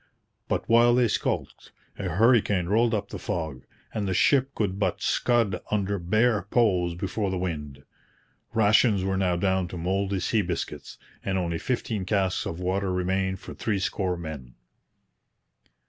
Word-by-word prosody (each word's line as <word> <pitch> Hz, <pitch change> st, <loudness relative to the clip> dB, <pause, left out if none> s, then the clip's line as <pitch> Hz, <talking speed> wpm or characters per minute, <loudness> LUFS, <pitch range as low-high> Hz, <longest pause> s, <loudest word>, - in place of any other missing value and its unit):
But -, -, -2 dB
while 120 Hz, +1 st, +5 dB
they 125 Hz, -1 st, +4 dB
skulked, 105 Hz, -, -3 dB, 0.3 s
a 95 Hz, -, -2 dB
hurricane 105 Hz, -1 st, +3 dB
rolled 115 Hz, +5 st, +2 dB
up 100 Hz, -1 st, -3 dB
the 105 Hz, -, -6 dB
fog; 80 Hz, -7 st, -4 dB, 0.3 s
and 105 Hz, -2 st, -2 dB
the 95 Hz, -, -1 dB
ship 140 Hz, +4 st, +3 dB
could 100 Hz, -3 st, -1 dB
but 100 Hz, -, 0 dB
scud 115 Hz, -6 st, +1 dB
under 100 Hz, -1 st, 0 dB
bare 110 Hz, +5 st, +2 dB
poles 90 Hz, -8 st, +2 dB
before 100 Hz, +3 st, -2 dB
the 95 Hz, -, -2 dB
wind. 75 Hz, -6 st, -4 dB, 0.7 s
Rations 105 Hz, -2 st, +4 dB
were 95 Hz, 0 st, 0 dB
now 95 Hz, -2 st, +1 dB
down 95 Hz, 0 st, +1 dB
to 90 Hz, -, -7 dB
mouldy 95 Hz, +3 st, -1 dB
sea 110 Hz, +4 st, +1 dB
biscuits, 85 Hz, -3 st, -5 dB, 0.3 s
and 95 Hz, -1 st, -1 dB
only 85 Hz, -2 st, -1 dB
fifteen 115 Hz, -5 st, -2 dB
casks 95 Hz, -1 st, 0 dB
of 80 Hz, -, -5 dB
water 95 Hz, +1 st, -1 dB
remained 95 Hz, +1 st, -1 dB
for -, -, -8 dB
three 105 Hz, -3 st, -1 dB
score 95 Hz, -1 st, -1 dB
men. 75 Hz, -7 st, -8 dB
95 Hz, 155 wpm, -26 LUFS, 90-110 Hz, 0.7 s, while